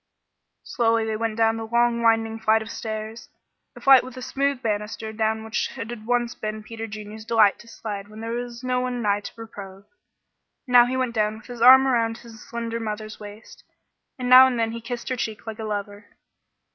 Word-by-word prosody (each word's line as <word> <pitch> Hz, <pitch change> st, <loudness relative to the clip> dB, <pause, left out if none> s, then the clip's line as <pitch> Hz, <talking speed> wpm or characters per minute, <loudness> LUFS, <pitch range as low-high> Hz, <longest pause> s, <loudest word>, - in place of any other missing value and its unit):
Slowly 230 Hz, -2 st, +1 dB
they 220 Hz, -1 st, -2 dB
went 225 Hz, 0 st, -2 dB
down 225 Hz, 0 st, +2 dB
the 225 Hz, 0 st, -5 dB
long 235 Hz, 0 st, +2 dB
winding 225 Hz, -1 st, +2 dB
flight 220 Hz, 0 st, +2 dB
of 220 Hz, -, -9 dB
stairs 220 Hz, +1 st, -6 dB, 0.5 s
a -, -, -11 dB
flight 270 Hz, -2 st, +7 dB
with 255 Hz, 0 st, -10 dB
a -, -, -6 dB
smooth 275 Hz, 0 st, -1 dB
banister 220 Hz, 0 st, -3 dB
down 220 Hz, 0 st, -1 dB
which 220 Hz, 0 st, -3 dB
it 230 Hz, -, -5 dB
had 220 Hz, -2 st, -9 dB
once 240 Hz, -1 st, +1 dB
been 215 Hz, 0 st, -5 dB
Peter 225 Hz, +1 st, -7 dB
Junior's 215 Hz, 0 st, -9 dB
delight 220 Hz, -3 st, +3 dB
to 235 Hz, -, -15 dB
slide 205 Hz, -3 st, -6 dB
when 215 Hz, +1 st, -12 dB
there 225 Hz, +1 st, -5 dB
was 240 Hz, 0 st, -5 dB
no 250 Hz, 0 st, 0 dB
one 250 Hz, -1 st, -3 dB
nigh 205 Hz, -1 st, +2 dB
to 205 Hz, -, -8 dB
reprove. 200 Hz, -4 st, -10 dB, 0.8 s
Now 245 Hz, -2 st, +6 dB
he 260 Hz, +1 st, -2 dB
went 255 Hz, -2 st, -1 dB
down 215 Hz, -1 st, 0 dB
with 220 Hz, -, -16 dB
his 245 Hz, -2 st, -9 dB
arm 260 Hz, +2 st, +9 dB
around 230 Hz, -3 st, +1 dB
his 230 Hz, -2 st, -13 dB
slender 230 Hz, 0 st, -5 dB
mother's 215 Hz, -1 st, -5 dB
waist, 210 Hz, +1 st, -12 dB, 0.5 s
and 250 Hz, -1 st, -4 dB
now 255 Hz, +1 st, +9 dB
and 255 Hz, -2 st, -1 dB
then 225 Hz, -1 st, 0 dB
he 230 Hz, 0 st, -6 dB
kissed 235 Hz, 0 st, -6 dB
her 255 Hz, -, -1 dB
cheek 220 Hz, -3 st, -5 dB
like 220 Hz, 0 st, -7 dB
a 220 Hz, -, -4 dB
lover. 205 Hz, -1 st, -5 dB
225 Hz, 210 wpm, -24 LUFS, 215-240 Hz, 0.8 s, arm